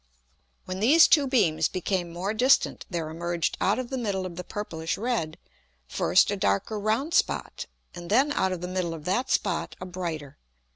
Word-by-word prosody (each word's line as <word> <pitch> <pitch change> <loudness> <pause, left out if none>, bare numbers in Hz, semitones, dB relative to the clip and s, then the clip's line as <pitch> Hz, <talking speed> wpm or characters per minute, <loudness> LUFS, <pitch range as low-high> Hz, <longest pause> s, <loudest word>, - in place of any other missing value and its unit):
When 185 0 -5
these 295 - +6
two 290 -4 +4
beams 165 - +2
became 185 -1 -2
more 185 +5 -3
distant 255 +5 +2
there 170 -4 -3
emerged 170 0 -2
out 200 - +2
of 255 -1 -5
the 265 - -2
middle 200 -5 -2
of 175 -2 -7
the 180 - -6
purplish 165 -5 -4
red, 215 -9 -2 0.5
first - - +3
a - - 0
darker 100 - 0
round 225 +10 -1
Spot, - - 0 0.3
and 175 -1 -9
then 265 +8 +3
out 190 -9 +1
of 180 -2 -4
the 180 - -4
middle 180 -2 -2
of 155 -2 -11
that 240 +8 0
Spot 180 -4 -1
a 185 - -6
brighter. 165 - -6
185 Hz, 185 wpm, -26 LUFS, 170-225 Hz, 0.5 s, these